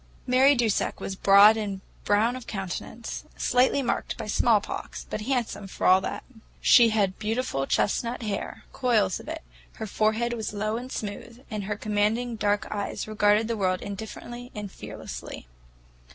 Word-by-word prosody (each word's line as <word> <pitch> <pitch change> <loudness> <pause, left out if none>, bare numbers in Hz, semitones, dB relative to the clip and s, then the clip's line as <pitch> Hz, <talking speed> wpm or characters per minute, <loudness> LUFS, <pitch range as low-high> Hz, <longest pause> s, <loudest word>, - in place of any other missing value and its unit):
Mary 265 +3 +5
Dusak 235 -4 0
was 195 - -4
broad 200 +3 +7
and 200 -3 -3 0.3
brown 220 +4 +3
of 255 -2 -9
countenance, 195 +3 -5
slightly 255 +3 +2
marked 240 - -2
by - - -5
smallpox, - - 0
but - - -4
handsome 235 -4 -2
for - - -5
all 185 +1 +6
that. - - -4 0.4
She 235 -2 +7
had 200 -4 0
beautiful 215 - -1
chestnut 235 +4 0
hair, 210 -2 -4
coils 215 -8 +2
of - - -12
it; 320 0 -5 0.3
her 220 - -6
forehead 220 +3 0
was 220 -2 -4
low 215 +1 -1
and 250 +3 -6
smooth, 225 +3 -6
and 210 -2 -3
her 210 +1 -2
commanding 215 +3 0
dark 205 -1 0
eyes 205 0 -3
regarded 215 0 +3
the 230 - -1
world 185 -2 0
indifferently 225 +4 -7
and 210 -2 -6
fearlessly. - - -8
215 Hz, 155 wpm, -26 LUFS, 205-240 Hz, 0.4 s, broad